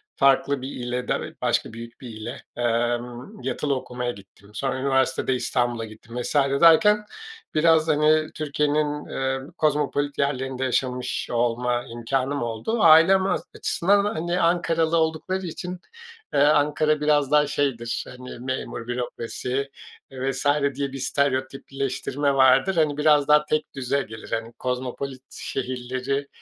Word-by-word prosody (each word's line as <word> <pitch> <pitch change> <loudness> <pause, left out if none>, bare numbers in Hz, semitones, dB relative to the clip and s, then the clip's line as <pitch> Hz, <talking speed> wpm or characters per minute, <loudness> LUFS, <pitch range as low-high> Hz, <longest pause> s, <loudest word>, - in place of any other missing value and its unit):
farklı 135 0 +3
bir 130 - -5
ile 125 0 -4
da - - 0 0.2
başka - - 0
büyük 115 +2 -10
bir 125 - -8
ile, 110 +4 -7
emm, 120 - -2
yatılı 145 -2 -1
okumaya 125 -1 -4
gittim. 100 -1 -16
Sonra 130 +3 -2
üniversitede 130 -1 +1
İstanbul'a 120 -2 -1
gittim 110 +2 -11
vs. 120 - -4
derken 165 +9 +5 0.5
biraz, 160 0 +4
hani, 155 +1 +3
Türkiye'nin, 150 0 0
eee, 135 0 -2 0.2
kozmopolit 145 -1 0
yerlerinde 135 -2 -1
yaşamış 125 -1 -1
olma 120 +1 0
imkânım 130 +3 -2
oldu. 120 - -2
Ailem 165 +4 +7
az 195 - 0
açısından, 200 +3 +2
hani, 175 -2 -1
Ankaralı 165 -1 +2
oldukları 165 +4 -1
için, 180 +2 -6 0.5
eee, - - +2
Ankara 150 +1 +3
biraz 150 -2 +2
daha 150 0 +4
şeydir, 120 -5 -1
hani, 125 -1 -9
memur, 130 -2 -4
bürokrasi, 125 +2 -3 0.4
eee, 135 +1 -2
vs. 140 - -6 0.3
diye 140 0 -2
bir 135 - -6
stereotipleştirme 135 +1 -1
vardır. 135 +7 +5
Hani, 155 -3 +2
biraz 150 -1 +4
daha 150 0 +5
tekdüze 140 -3 -1
gelir, 110 -2 -10
hani, 115 +1 -3
kozmopolit 130 +2 -4
şehirleri 130 +2 -3
135 Hz, 130 wpm, -24 LUFS, 125-150 Hz, 0.5 s, Ailem